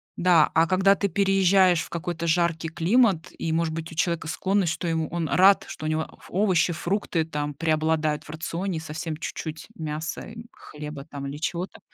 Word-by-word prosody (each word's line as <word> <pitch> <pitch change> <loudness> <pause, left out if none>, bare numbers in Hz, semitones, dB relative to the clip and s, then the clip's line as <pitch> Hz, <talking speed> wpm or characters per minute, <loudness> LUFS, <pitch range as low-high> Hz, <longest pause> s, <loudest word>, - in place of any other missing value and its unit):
Да, 175 -3 +4
а 165 0 +4
когда 190 +2 +4
ты 200 - 0
переезжаешь 190 -2 +4
в - - -7
какой-то 170 0 -4
жаркий 165 -1 +1
климат 185 0 +2
и, 160 - -2
может 165 -1 0
быть, 165 0 -5
у - - -10
человека 165 -1 0
склонность, 185 0 0
что 175 - -4
ему 160 -2 0
он 165 -3 -2
рад, 195 +2 +5
что 155 - -7
у - - 0
него 155 0 0
ф - - -15
овощи, 185 -3 +2
фрукты 170 -1 -1
там 150 -2 -3
преобладают 155 0 0
в - - -15
рационе, 165 +3 -3
и - - -5
совсем 155 +1 -5
чуть-чуть 160 0 -6
мяса, 155 +1 -4
и 225 +1 -9
хлеба 150 -2 -9
там, 140 -1 -6
или 140 +1 -6
чего-то. 170 +3 -4
165 Hz, 190 wpm, -25 LUFS, 155-185 Hz, -, рад